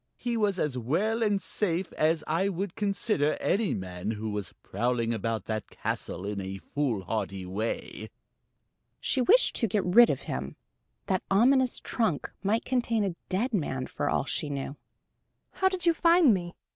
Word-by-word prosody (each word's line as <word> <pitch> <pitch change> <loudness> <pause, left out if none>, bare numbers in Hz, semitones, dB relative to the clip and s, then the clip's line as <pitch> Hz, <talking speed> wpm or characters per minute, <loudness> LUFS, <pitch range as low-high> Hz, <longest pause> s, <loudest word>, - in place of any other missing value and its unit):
"He 240 -1 -2
was 205 -4 +1
as 145 -7 -1
well 195 - 0
and 205 -3 +2
safe 185 -3 -2
as 155 0 +1
I 170 +6 +1
would 190 0 -3
consider 200 -7 0
any 205 -1 +1
man 90 0 -5
who 110 0 -3
was 105 -3 -4
prowling 115 +2 0
about 110 -1 -2
that 110 -2 -3
castle 95 - -4
in 100 -1 -3
a 95 0 -5
foolhardy 105 -6 -2
way." 105 +5 -4 0.9
She 265 - +1
wished 470 - +5
to 230 - +2
get 205 0 0
rid 230 +7 +7
of 135 - -1
him: 65 +1 -5 0.5
that 190 - 0
ominous 255 +5 +4
trunk 220 - -1
might 215 +3 0
contain 235 -4 +1
a 190 -4 -2
dead 225 +7 0
man, 135 -9 -1
for - - -2
all - - +1
she 150 - -1
knew. 140 0 -4 0.8
"How 380 - +2
did 370 -2 -4
you 340 - +5
find 335 -5 +5
me? 175 -2 -3
175 Hz, 165 wpm, -28 LUFS, -, 0.9 s, rid